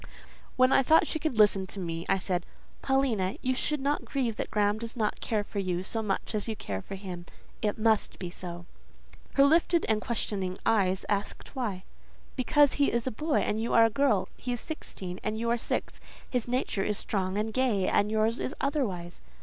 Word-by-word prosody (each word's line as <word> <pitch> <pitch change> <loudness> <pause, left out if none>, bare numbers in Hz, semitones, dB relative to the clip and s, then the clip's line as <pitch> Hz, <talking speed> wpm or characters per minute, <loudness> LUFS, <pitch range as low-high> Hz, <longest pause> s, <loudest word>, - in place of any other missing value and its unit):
When 255 +1 +5
I - - +6
thought 315 +5 +5
she 315 - -2
could 310 -7 -2
listen 200 -3 +4
to 195 - -7
me, 165 -2 -4
I 195 - +4
said—"Paulina, 195 +4 -1
you 255 - +2
should 300 +3 0
not 285 +2 0
grieve 250 -5 -1
that - - -3
Graham 210 0 +1
does 230 0 -6
not 215 -2 -1
care 215 -2 0
for 205 - -5
you 180 -2 -1
so 225 +3 -2
much 200 -3 -2
as 210 0 -1
you 220 - -2
care 95 - -4
for 195 - -7
him. 180 -3 -7 0.3
It 210 -2 0
must 220 -1 +2
be 180 -2 -5
so." 175 -1 -7 0.7
Her 275 - +6
lifted 330 +3 +4
and 220 -1 +2
questioning 195 -5 -2
eyes 195 -4 +2
asked 205 +6 -3
why. 210 -8 -2 0.5
"Because 285 +2 +4
he 285 - +2
is 235 0 0
a 260 - -1
boy 300 +7 0
and 215 +1 -1
you 230 - -1
are 230 - +8
a 225 - +2
girl; 230 -5 +2
he 250 - -3
is 240 - -2
sixteen 190 - -6
and 215 0 -1
you 230 +1 -1
are - - +3
only 240 - +1
six; - - -3 0.3
his 250 -3 -1
nature 245 -5 -1
is 210 0 -1
strong 190 -1 -2
and 215 +1 -1
gay, 230 -7 +2
and 205 - +2
yours 220 +2 +1
is 275 - -3
otherwise." 200 - -2
215 Hz, 205 wpm, -29 LUFS, 195-255 Hz, 0.7 s, are